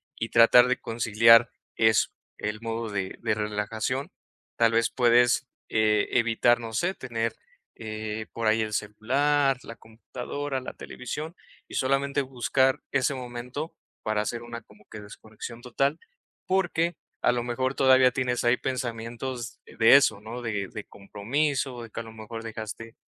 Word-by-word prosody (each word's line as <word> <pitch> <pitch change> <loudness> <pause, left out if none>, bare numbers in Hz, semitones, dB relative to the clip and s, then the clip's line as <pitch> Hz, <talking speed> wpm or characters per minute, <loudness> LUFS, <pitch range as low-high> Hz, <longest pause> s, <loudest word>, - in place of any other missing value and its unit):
y 115 - -4
tratar 120 +1 +7
de 130 0 +1
conciliar 115 0 +5 0.2
eso, 110 -1 +3 0.3
el 105 +1 -4
modo 115 0 -3
de 95 -2 -3
de - - +1
relajación, 105 +5 -2 0.5
tal 115 -1 +4
vez, 115 0 +3
puedes, 120 +1 +3 0.2
eh, 105 -1 +2
evitar, 120 0 +3
no 115 -1 -6
sé, 175 - 0
tener, 115 - -3 0.5
eh, 110 0 -5
por 115 -1 -3
ahí 110 +1 +3
el 110 -1 -3
celular, 135 +7 +1
la 115 - -9
computadora, 130 +5 -5
la - - -7
televisión 150 +7 -6 0.4
y - - -8
solamente 140 +1 +1
buscar 130 0 +1
ese 140 0 +1
momento 125 +4 -6 0.3
para 110 -1 0
hacer 115 +2 -3
una, 120 0 -7
como 105 0 -21
que, 105 - -7
desconexión 110 +3 -10
total, 135 +5 0 0.5
porque 175 -3 0 0.2
a - - +4
lo 120 -1 -1
mejor 130 +2 -1
todavía 130 -1 +5
tienes 125 -1 -1
ahí 120 +1 +3
pensamientos 120 0 -4
de 115 +4 +5
eso, 110 -7 +4
¿no?, 115 +3 -7
de 105 -4 -2
de 105 - -7
compromiso, 125 +5 -2
de 115 - -10
que 115 - -7
a - - -7
lo 110 - -11
mejor 110 +1 -8
dejaste 110 0 -7
120 Hz, 155 wpm, -27 LUFS, 110-130 Hz, 0.5 s, tratar